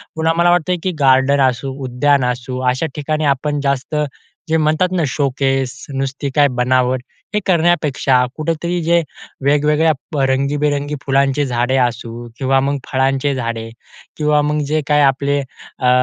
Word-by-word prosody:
पुन्हा 160 0 +1
मला 175 0 +4
वाटतं 175 +1 +2
की 185 - 0
गार्डन 135 +1 +4
असू, 130 +2 -2
उद्यान 135 +2 +2
असू, 125 +1 -3
अशा 130 +6 -1
ठिकाणी 155 +1 -2
आपण 145 +1 0
जास्त 140 +1 -1 0.5
जे 160 - +3
म्हणतात 155 +4 +1
ना 170 - +1
शोकेस 135 -2 -1
नुसती 135 +1 -3
काय 145 -1 +5
बनावट. 125 0 +2 0.3
हे 210 - +2
करण्यापेक्षा 155 -7 +2
कुठेतरी 165 +3 -2
जे 170 +1 +3 0.4
वेगवेगळ्या 150 0 +1
रंगीबेरंगी 145 +2 0
फुलांचे 140 +1 +2
झाडे 125 0 0
असू 120 0 -7
किंवा 135 0 +2
मग 140 +1 0
फळांचे 135 +1 +1
झाडे, 115 -2 -4 0.5
किंवा 150 -1 +2
मग 150 +1 0
जे 155 0 +1
काही 150 0 +3
आपले 140 +1 +2
अ, 130 -1 -4
140 Hz, 140 wpm, -17 LUFS, 130-150 Hz, 0.5 s, काय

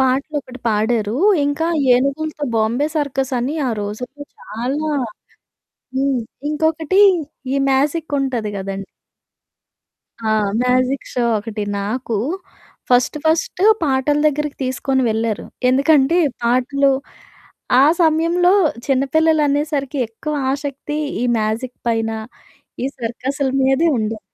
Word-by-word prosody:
పాటలు 265 +4 +1
ఒకటి 255 -1 -12
పాడారు. 220 0 0 0.3
ఇంకా 290 +3 0 0.3
ఏనుగులతో 290 +4 -1
బాంబే 230 +6 +1
సర్కస్ 270 -3 -1
అని 255 +5 -2
ఆ - - 0
రోజుల్లో 250 +8 -6
చాలా, 270 +8 -3 1.1
హ్మ్. 270 -1 +1 0.3
ఇంకొకటి 320 +4 +2 0.5
ఈ - - +1 0.2
మ్యాజిక్ 295 +3 0
ఉంటది 240 -6 -2
కదండీ. 195 0 -5 1.4
ఆ! - - +2 0.3
మ్యాజిక్ 255 +2 +1
షో 245 -1 0
ఒకటి. 210 0 -5 0.2
నాకు 225 +3 -2 0.7
ఫస్ట్ 250 +4 +3
ఫస్ట్ 320 +3 +1 0.2
పాటల 285 0 +1
దగ్గరికి 300 0 -1
తీసుకొని 260 +1 0
వెళ్లారు. 220 -1 -1 0.2
ఎందుకంటే 280 +4 +4 0.3
పాటలు 255 +4 +2 0.9
ఆ - - +7 0.2
సమయంలో 335 +3 +3 0.3
చిన్నపిల్లలనేసరికి 290 0 +1
ఎక్కువ 300 +7 -5 0.2
ఆసక్తి 285 +1 -4 0.2
ఈ - - +1
మ్యాజిక్ 225 +4 -2
పైన, 225 -1 0 0.7
ఈ - - +1
సర్కస్ల 265 +4 -2
మీదే 270 +5 +3
ఉండేది. 220 0 -2
270 Hz, 105 wpm, -19 LUFS, 240-295 Hz, 1.4 s, ఆ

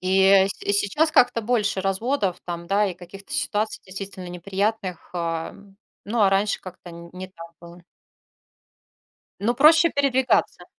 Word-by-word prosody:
И, 190 +1 +2
э, 195 0 +5
с - - -3
сейчас 205 +10 +1
как-то 250 -6 +3
больше 210 -4 0
разводов 195 +1 -1
там, 170 -1 -6
да, 200 +3 +2
и 185 - -4
каких-то 195 +8 -13
ситуаций 220 -6 -2
действительно 190 -1 -8
неприятных. 190 +1 -3
Э, 165 -1 -3 0.5
ну 220 +3 -2
а 195 - +5
раньше 200 +2 +1
как-то 180 -1 -11
н 170 0 -11
не 185 +1 -8
так 170 -3 -12
было. 170 0 -14 1.6
Но 235 +4 +1
проще 310 +4 +6
передвигаться. 265 -2 +1
195 Hz, 145 wpm, -23 LUFS, 180-225 Hz, 1.6 s, проще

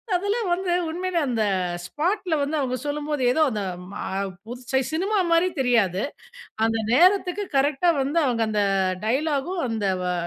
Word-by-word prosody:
அதெல்லாம் 405 +2 0
வந்து 360 0 0 0.2
உண்மையிலே 355 +2 -1
அந்த 235 -5 0 0.4
ஸ்பாட்டுல 345 - -1
வந்து 290 +3 -1
அவங்க 255 -2 -1
சொல்லும்போது, 295 -1 -2
ஏதோ 315 - +1
அந்த 210 - -2 0.3
மா - - -6 0.4
புது 245 +2 -8
சை 265 0 +3
சினிமா 395 +6 0
மாரி 335 +2 +4
தெரியாது. 220 -7 +2 0.6
அந்த 225 0 +1 0.2
நேரத்துக்கு 370 +5 +4
கரெக்ட்‌டா 290 +5 +3
வந்து, 285 +5 -1
அவங்க 235 -3 +1
அந்த 210 -1 +1 0.4
டயலாகும், 300 +7 0
அந்த 225 -2 -3 0.2
வா 180 0 0
295 Hz, 145 wpm, -24 LUFS, 245-355 Hz, 0.6 s, மாரி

